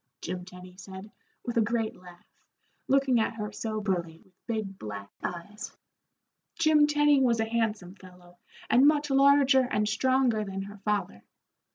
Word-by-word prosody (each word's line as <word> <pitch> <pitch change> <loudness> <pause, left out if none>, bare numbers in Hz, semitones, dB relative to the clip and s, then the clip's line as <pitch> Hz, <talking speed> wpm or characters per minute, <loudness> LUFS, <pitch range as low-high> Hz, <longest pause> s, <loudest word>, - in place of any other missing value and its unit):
Jim 180 +1 -5
Tenny 180 0 -13
said, 190 +2 -10 0.3
with 240 -1 -3
a - - +5
great 225 0 -1
laugh, 180 -1 -16 0.6
looking 270 -2 +3
at 225 +1 -1
her 210 -2 -5
soberly, 190 -7 -3
with 190 -3 -32
big 215 -4 -4
black 100 -2 -7
eyes. 180 +5 -7 0.8
Jim 310 -3 +4
Tenny 295 -1 +3
was 235 -3 +2
a 225 - +1
handsome 220 -5 -2
fellow, 180 -2 -17 0.3
and 260 +4 +5
much 295 -1 +2
larger 275 0 +5
and 210 -3 0
stronger 255 -2 +1
than 195 -1 -5
her 200 +1 -11
father. 210 +1 -2
215 Hz, 150 wpm, -28 LUFS, 185-260 Hz, 0.8 s, a